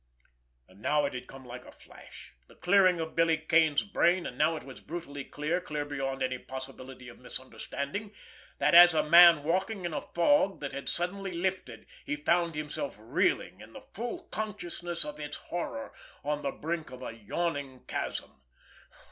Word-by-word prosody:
And 95 Hz, +2 st, -19 dB
now 150 Hz, +5 st, +2 dB
it 140 Hz, -, -3 dB
had 125 Hz, 0 st, -6 dB
come 135 Hz, -1 st, -12 dB
like 125 Hz, 0 st, -8 dB
a -, -, -13 dB
flash, -, -, -14 dB
the -, -, -18 dB
clearing 185 Hz, -1 st, +4 dB
of 160 Hz, 0 st, -4 dB
Billy 165 Hz, -1 st, +4 dB
Kane's 155 Hz, -1 st, +3 dB
brain, 185 Hz, -3 st, +2 dB
and -, -, -5 dB
now 165 Hz, -, +2 dB
it 155 Hz, -, -7 dB
was 135 Hz, -, -11 dB
brutally 150 Hz, -4 st, -6 dB
clear, 150 Hz, +6 st, -2 dB
clear 150 Hz, -3 st, -3 dB
beyond 135 Hz, -2 st, -3 dB
any 130 Hz, -1 st, -1 dB
possibility 130 Hz, -1 st, -9 dB
of 120 Hz, -, -12 dB
misunderstanding; 140 Hz, -, -6 dB, 0.5 s
and, -, -, +4 dB
as 175 Hz, -1 st, +10 dB
a 155 Hz, -, +2 dB
man 170 Hz, -2 st, +9 dB
walking 185 Hz, +4 st, -1 dB
in 170 Hz, -, -3 dB
a -, -, -2 dB
fog 195 Hz, +2 st, +2 dB
that 140 Hz, -, -4 dB
had 140 Hz, -, -4 dB
suddenly 185 Hz, +2 st, -2 dB
lifted, 170 Hz, -10 st, -3 dB, 0.2 s
he -, -, -2 dB
found 170 Hz, +2 st, +1 dB
himself 150 Hz, -3 st, -4 dB
reeling, 125 Hz, -, 0 dB
in -, -, -13 dB
the -, -, -11 dB
full 245 Hz, +10 st, -5 dB
consciousness 175 Hz, -5 st, -3 dB
of 150 Hz, 0 st, -7 dB
its 150 Hz, -1 st, -5 dB
horror, 170 Hz, -10 st, -5 dB, 0.3 s
on 150 Hz, +1 st, -1 dB
the 140 Hz, -1 st, -1 dB
brink 160 Hz, +2 st, -4 dB
of 130 Hz, 0 st, -10 dB
a -, -, -5 dB
yawning 135 Hz, +3 st, -3 dB
chasm. -, -, -4 dB
155 Hz, 175 wpm, -30 LUFS, 135-175 Hz, 0.5 s, as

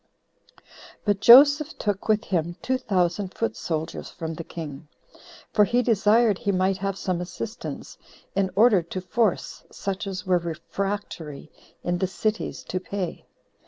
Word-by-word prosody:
5. -, -, -26 dB, 0.4 s
But 205 Hz, -2 st, +2 dB
Joseph 285 Hz, +6 st, +7 dB
took 205 Hz, -2 st, -2 dB
with 215 Hz, 0 st, +3 dB
him 175 Hz, -2 st, -1 dB
two 260 Hz, 0 st, 0 dB
thousand 185 Hz, -2 st, 0 dB
foot 230 Hz, -, -1 dB
soldiers 160 Hz, -1 st, -4 dB
from 165 Hz, -1 st, -5 dB
the 165 Hz, -, -6 dB
king, 155 Hz, -3 st, -8 dB, 0.7 s
for 210 Hz, -, +6 dB
he 245 Hz, +4 st, +2 dB
desired 220 Hz, -1 st, +3 dB
he 200 Hz, -, 0 dB
might 190 Hz, 0 st, +1 dB
have 195 Hz, 0 st, -3 dB
some 180 Hz, -3 st, -2 dB
assistance, 210 Hz, +5 st, -7 dB, 0.4 s
in 195 Hz, -1 st, +1 dB
order 210 Hz, -3 st, +5 dB
to 170 Hz, +3 st, -6 dB
force 200 Hz, +3 st, -1 dB
such 195 Hz, +1 st, -4 dB
as 185 Hz, -2 st, -5 dB
were 180 Hz, -1 st, +3 dB
refractory 170 Hz, -2 st, -5 dB, 0.3 s
in 175 Hz, 0 st, -1 dB
the 190 Hz, -, +1 dB
cities 215 Hz, +3 st, -2 dB
to 185 Hz, -, -3 dB
pay. 185 Hz, -1 st, -5 dB
195 Hz, 150 wpm, -25 LUFS, 175-215 Hz, 0.7 s, Joseph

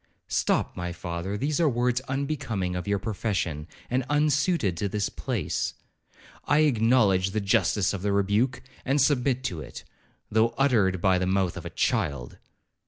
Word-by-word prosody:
'Stop, -, -, 0 dB
my 90 Hz, 0 st, -4 dB
father, 85 Hz, +3 st, -4 dB
these 145 Hz, +6 st, -1 dB
are 165 Hz, -3 st, +4 dB
words 125 Hz, 0 st, +1 dB
unbecoming 130 Hz, -9 st, -2 dB
your 100 Hz, 0 st, +1 dB
profession, 95 Hz, -7 st, -2 dB, 0.2 s
and 130 Hz, +2 st, 0 dB
unsuited 145 Hz, -, +2 dB
to 100 Hz, +4 st, -2 dB
this 105 Hz, +1 st, -1 dB
place.' -, -, -3 dB, 0.7 s
'I 145 Hz, -, +3 dB
acknowledge 115 Hz, -8 st, +3 dB
the 110 Hz, -, -1 dB
justice 100 Hz, 0 st, +2 dB
of 100 Hz, -, -4 dB
the 100 Hz, +1 st, 0 dB
rebuke, 105 Hz, +6 st, +1 dB, 0.2 s
and 135 Hz, +2 st, +1 dB
submit 130 Hz, -2 st, +2 dB
to 90 Hz, -11 st, -3 dB
it, -, -, -9 dB, 0.5 s
though 115 Hz, +2 st, +2 dB
uttered 105 Hz, -10 st, +2 dB
by 95 Hz, -1 st, +3 dB
the 90 Hz, -, -1 dB
mouth 95 Hz, -2 st, +1 dB
of -, -, -6 dB
a -, -, -6 dB
child.' 70 Hz, -5 st, -1 dB
105 Hz, 155 wpm, -26 LUFS, 95-130 Hz, 0.7 s, are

